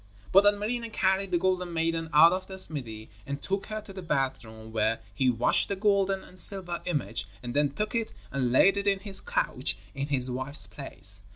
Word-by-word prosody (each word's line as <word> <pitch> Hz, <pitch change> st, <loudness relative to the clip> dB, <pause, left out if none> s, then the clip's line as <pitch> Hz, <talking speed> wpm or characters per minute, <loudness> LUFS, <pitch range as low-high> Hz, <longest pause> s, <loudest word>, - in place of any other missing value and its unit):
But 195 Hz, +2 st, +6 dB
Ilmarinen 215 Hz, +3 st, 0 dB
carried 190 Hz, -1 st, +1 dB
the 175 Hz, -, +1 dB
golden 180 Hz, -1 st, -1 dB
maiden 165 Hz, 0 st, -1 dB
out 165 Hz, +3 st, +7 dB
of 185 Hz, 0 st, -4 dB
the 190 Hz, -, -8 dB
smithy 115 Hz, -12 st, 0 dB, 0.2 s
and 140 Hz, 0 st, -4 dB
took 195 Hz, +5 st, -2 dB
her 215 Hz, 0 st, -4 dB
to 200 Hz, -, -12 dB
the 190 Hz, -, -7 dB
bath 135 Hz, -8 st, -1 dB
room 110 Hz, 0 st, -12 dB
where 110 Hz, 0 st, +1 dB
he 130 Hz, -2 st, +2 dB
washed 120 Hz, 0 st, +2 dB
the 200 Hz, -, -1 dB
golden 195 Hz, -1 st, +1 dB
and 185 Hz, -, -9 dB
silver 180 Hz, -2 st, +2 dB
image 145 Hz, -9 st, -2 dB, 0.2 s
and 120 Hz, 0 st, -5 dB
then 145 Hz, 0 st, +2 dB
took 210 Hz, +10 st, -4 dB
it 230 Hz, -2 st, -1 dB, 0.2 s
and 130 Hz, -3 st, -1 dB
laid 195 Hz, +10 st, +5 dB
it 200 Hz, 0 st, -2 dB
in 195 Hz, -1 st, +2 dB
his 195 Hz, -1 st, +1 dB
couch, -, -, -2 dB, 0.2 s
in 140 Hz, 0 st, -4 dB
his 130 Hz, -3 st, 0 dB
wife's 130 Hz, +4 st, 0 dB
place. 100 Hz, -8 st, 0 dB
170 Hz, 205 wpm, -28 LUFS, 130-195 Hz, 0.2 s, out